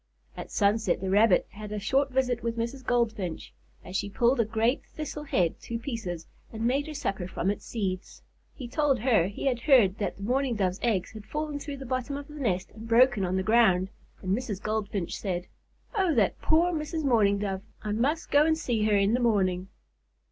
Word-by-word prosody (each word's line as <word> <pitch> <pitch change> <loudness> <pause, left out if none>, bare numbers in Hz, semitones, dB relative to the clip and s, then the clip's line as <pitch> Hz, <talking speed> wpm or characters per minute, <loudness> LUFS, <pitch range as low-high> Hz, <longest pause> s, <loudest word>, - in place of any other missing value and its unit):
At - - -7
sunset, 205 -2 +2
the 190 0 -2
Rabbit 205 -1 +5
had 210 0 -8
a 210 - -3
short 265 +7 +1
visit 255 -2 0
with 230 0 -3
Mrs. 235 +4 -3
Goldfinch, 220 -8 -1 0.3
as 180 - -8
she 200 +1 -1
pulled 240 +5 +2
a 230 - +4
great 225 +4 0
thistle 300 -1 -7
head 175 - +1
to 230 - -4
pieces 225 - -5 0.3
and 225 0 -3
made 275 +5 +1
her 310 - -6
supper 195 -10 -2
from 185 +1 -1
its 205 - -7
seeds. 190 -4 -4 0.3
He 255 - -7
told 285 +1 +2
her 220 -9 +3
he 200 - -6
had 255 -3 +1
heard 235 -8 +4
that 205 - -2
the 200 - -9
Mourning 255 +2 +1
Dove's 190 -2 0
eggs 215 -7 0
had 215 -1 -11
fallen 300 -1 -3
through 285 -1 -6
the 270 - -8
bottom 255 +2 -2
of 285 0 -8
the 300 - -12
nest 195 -8 -1
and 220 +1 -10
broken 235 -2 +4
on 185 0 0
the 190 - 0
ground, 190 -4 +4 0.3
and 185 +1 +1
Mrs. 220 -5 -4
Goldfinch 210 -4 -2
said: 180 -3 -3 0.5
"Oh, 380 -7 +2
that - - +2
poor 335 +3 +3
Mrs. 315 0 -3
Mourning 215 -7 +3
Dove! 195 -2 -2 0.2
I 210 - -2
must 275 +10 0
go 295 +2 +5
to 320 - +3
see 240 -9 -1
her 210 -1 +3
in 200 +2 +3
the 245 - +2
morning." 190 -6 +1
225 Hz, 205 wpm, -28 LUFS, 200-265 Hz, 0.5 s, Rabbit